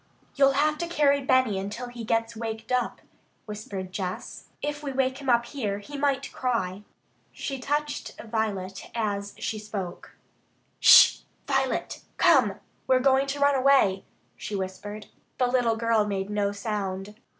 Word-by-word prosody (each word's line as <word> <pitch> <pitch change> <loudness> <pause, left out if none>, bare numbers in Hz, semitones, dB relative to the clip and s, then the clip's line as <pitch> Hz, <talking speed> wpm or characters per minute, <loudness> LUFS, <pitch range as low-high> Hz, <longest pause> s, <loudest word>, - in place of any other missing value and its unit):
"You'll 275 -1 +4
have 300 +2 +1
to 340 - -2
carry 285 -4 +3
Benny 255 -6 +2
until 210 +6 -5
he 240 -1 -8
gets 225 +1 0
waked 225 0 -5
up," 250 -1 0 0.4
whispered 205 -3 -6
Jess. 185 -1 -5 0.2
"If 295 0 -3
we 285 -2 -4
wake 260 0 0
him 275 -2 -4
up 235 -1 +4
here, 225 -6 -3
he 285 +8 -10
might 275 -1 -1
cry." 205 -7 -1 0.5
She 275 -2 -5
touched 295 +3 -3
Violet 205 -4 -3
as 205 -3 -2
she 215 - -3
spoke. 200 -4 -7 0.6
"Sh! - - +8 0.3
Violet! 270 -1 -1 0.2
Come! 260 - +4 0.3
We're 260 - +5
going 270 +1 +3
to 280 +1 -3
run 285 0 +4
away," 260 -8 +4 0.3
she 210 - -6
whispered. 200 +2 -5 0.3
The 255 - +3
little 245 -2 +2
girl 225 -2 +2
made 195 0 -3
no 205 -1 0
sound. 200 -1 -4
230 Hz, 150 wpm, -26 LUFS, 205-270 Hz, 0.6 s, Sh